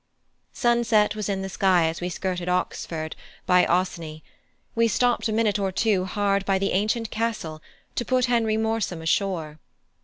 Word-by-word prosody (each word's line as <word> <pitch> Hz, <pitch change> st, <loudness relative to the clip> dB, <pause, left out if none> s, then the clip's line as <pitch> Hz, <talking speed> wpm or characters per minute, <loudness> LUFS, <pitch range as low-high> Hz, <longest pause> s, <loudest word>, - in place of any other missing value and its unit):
Sunset 235 Hz, -4 st, +2 dB
was 210 Hz, -1 st, -3 dB
in 190 Hz, -1 st, -1 dB
the -, -, -3 dB
sky 185 Hz, -3 st, +3 dB
as 160 Hz, +2 st, -4 dB
we 180 Hz, -, -2 dB
skirted 180 Hz, 0 st, -3 dB
Oxford 165 Hz, -3 st, -2 dB, 0.3 s
by 180 Hz, 0 st, +5 dB
Oseney; 170 Hz, -3 st, -1 dB, 0.5 s
we 230 Hz, 0 st, +3 dB
stopped 245 Hz, +2 st, +1 dB
a -, -, -2 dB
minute 215 Hz, -1 st, +1 dB
or 195 Hz, -1 st, 0 dB
two 195 Hz, -1 st, +1 dB
hard 200 Hz, 0 st, 0 dB
by 195 Hz, -1 st, +1 dB
the 195 Hz, +1 st, 0 dB
ancient 215 Hz, +4 st, 0 dB
castle 215 Hz, -9 st, -3 dB, 0.3 s
to -, -, -1 dB
put 255 Hz, 0 st, +2 dB
Henry 230 Hz, -3 st, +1 dB
Morsom 220 Hz, -7 st, -1 dB
ashore. 160 Hz, -3 st, -1 dB
195 Hz, 160 wpm, -25 LUFS, 180-225 Hz, 0.5 s, by